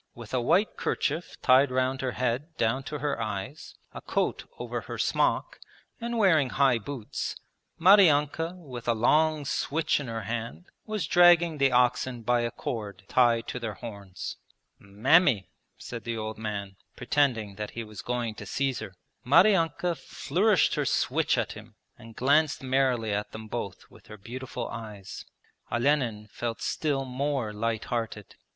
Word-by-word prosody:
With 115 -1 -10
a 130 - +1
white 175 - +2
kerchief 160 -2 -2
tied 130 +2 +6
round 130 +1 0
her 130 -2 -2
head 130 +6 -2
down 115 +4 +1
to 150 +4 -4
her 145 -5 -2
eyes, 110 - -5 0.2
a - - -7
coat - - -1
over - - -4
her - - -7
smock, - - 0 0.4
and 235 0 -3
wearing 165 - +4
high 135 -4 +3
boots, 120 -1 -5 0.4
Maryanka 165 -3 +5
with 130 -9 -9
a 120 - +3
long 150 +6 +3
switch 155 +3 0
in 140 - -6
her 115 -2 -4
hand 115 - -5 0.2
was 215 -2 -2
dragging 175 -3 +5
the 135 -1 +4
oxen 125 0 +2
by 120 +1 +2
a 120 - 0
cord 105 -4 -5
tied 120 -2 +3
to 125 - -4
their 110 -4 -4
horns. 100 -5 -7 0.4
'Mammy,' 110 - +3 0.3
said 115 -2 -7
the 115 -1 -3
old 110 0 -5
man, 100 -3 -5 0.2
pretending 120 -8 +1
that 105 -1 -4
he 115 - -2
was 105 -1 -9
going 120 -2 -2
to - - -9
seize 135 -2 -1
her. 100 -4 -8 0.3
Maryanka 175 - +4
flourished 185 +7 +1
her - - 0
switch - - +1
at - - -1
him - - -12 0.2
and 115 0 -14
glanced 145 +3 +2
merrily 130 -5 +1
at 105 +1 -3
them 110 0 -8
both 105 -4 -6
with - - -18
her 105 - -10
beautiful 125 +3 -6
eyes. 105 -4 -8 0.5
Olenin 120 -4 +1
felt 115 -1 -4
still 140 -3 -1
more 130 -3 -2
light 115 +1 -2
hearted. 115 -4 -4
125 Hz, 160 wpm, -28 LUFS, 110-145 Hz, 0.5 s, tied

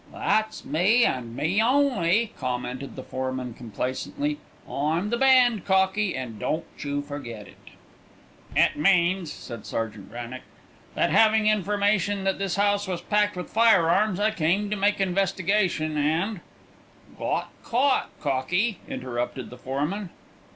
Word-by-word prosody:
"That's 215 +1 -1
me, 195 - +3
and 120 -2 -2
me 180 - +1
only!" 230 -5 +2
commented 125 +1 -4
the 130 - -7
foreman 130 -1 -4
complacently. 130 - -3 0.3
"I'm 160 +8 -1
the 235 - +1
band, 250 -5 +5
cockie, 190 +1 +2
and 120 -5 -6
don't 160 +2 -2
you 145 0 -2
forget 120 -8 -7
it." - - -17 0.8
"It - - +3
means," 175 0 +2
said 120 -2 -8
Sergeant 110 -3 -4
Wrannock, 120 +2 -7 0.5
"that - - +1
having 220 -1 +4
information 205 -1 +1
that 195 0 0
this 195 -3 -1
house 205 0 +1
was 180 -2 -3
packed 210 -1 +1
with 180 - -6
firearms, 210 -3 +4
I 215 +1 +2
came 195 +2 0
to - - +1
make 205 0 +1
investigation 185 -3 +1
and 165 +8 0 0.4
" - - -25
"Got - - -2
caught, 260 +3 +1
cockie," 170 - 0
interrupted 125 0 -4
the 125 - -10
foreman. 150 +10 -3
185 Hz, 135 wpm, -25 LUFS, 135-210 Hz, 0.8 s, band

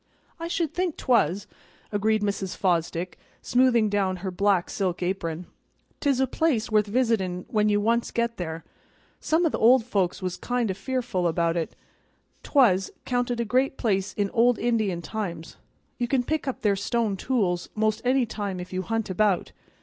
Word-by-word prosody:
"I 335 - -4
should 335 -3 -1
think 360 -2 -1
'twas," 200 -6 +2 0.5
agreed 215 +1 +1
Mrs. 200 -2 -2
Fosdick, 175 -1 -1 0.2
smoothing 245 -3 +3
down 200 -2 0
her 190 - -1
black 195 -1 +2
silk 185 -3 -1
apron. 175 -2 -2 0.5
"'Tis 280 -3 +1
a 265 - +4
place 260 -7 0
worth 210 -1 +3
visitin' 205 -6 0
when 215 -1 +2
you 205 0 +3
once 230 +3 +1
get 235 0 -1
there. 165 -2 -5 0.6
Some 325 +2 +1
o' - - +4
the - - -3
old 235 +1 +5
folks 190 -6 0
was 185 -2 -3
kind 245 -4 -1
o' - - -2
fearful 205 -3 -1
about 170 0 +1
it. 165 -2 -3 0.7
'Twas 200 -10 +3 0.2
'counted 245 -1 -1
a 235 - 0
great 260 +4 +1
place 200 -3 0
in 200 -1 -1
old 240 0 +4
Indian 215 -7 0
times; 170 -4 -5 0.4
you 240 - 0
can 255 0 +1
pick 310 +2 -2
up 265 - -3
their 205 -2 +3
stone 215 +1 0
tools 190 -6 -1
'most 215 0 +1
any 255 0 +3
time 200 -4 -4
if 180 +1 -8
you 185 - -1
hunt 225 0 -2
about. 195 -1 +1
210 Hz, 175 wpm, -26 LUFS, 185-245 Hz, 0.7 s, old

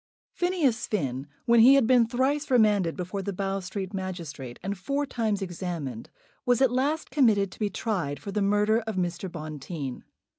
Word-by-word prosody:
Phineas 330 -11 +1
Finn, 135 - -2 0.2
when 235 0 +5
he 255 +5 +8
had 275 -4 +4
been 240 -1 +5
thrice 270 +5 0
remanded 210 -8 +3
before 185 +2 -3
the 200 - -3
Bow 195 +1 -2
Street 190 +1 -5
magistrate, 170 -10 -5
and 195 +1 -2
four 275 +10 -2
times 220 -6 -1
examined, 170 - -5 0.3
was 245 -1 +3
at 265 -2 +4
last 290 +5 0
committed 215 -9 +3
to - - -14
be 210 -2 0
tried 180 -8 -2
for 200 - -7
the 210 +1 -1
murder 210 +2 +3
of 220 - -2
Mr. 175 0 -2
Bonteen. 155 -4 -6
200 Hz, 175 wpm, -27 LUFS, 175-235 Hz, 0.3 s, he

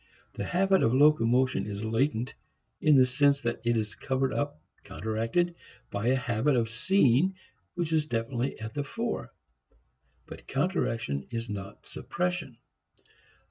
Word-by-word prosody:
The - - -4
habit 190 +1 +3
of 115 - +3
locomotion 130 -4 +4
is 105 +1 -4
latent 115 +2 0 0.5
in 155 -1 +5
the 130 -1 +7
sense 140 +2 +3
that 120 0 -2
it 120 0 +2
is 105 -1 -2
covered 130 0 -1
up, 145 - -2 0.2
counteracted, 115 +11 -1 0.4
by 100 +3 -2
a 130 - +4
habit 125 +2 +1
of 115 -2 0
seeing 140 +5 +3 0.4
which 170 -2 -1
is 155 -1 +2
definitely 120 +2 -2
at 110 0 -6
the 145 -1 -2
fore. 65 - -4 0.9
But - - -11
counteraction 115 - -1
is 115 -1 -4
not 100 0 -7
suppression. 175 -8 -3
125 Hz, 140 wpm, -28 LUFS, 115-150 Hz, 0.9 s, the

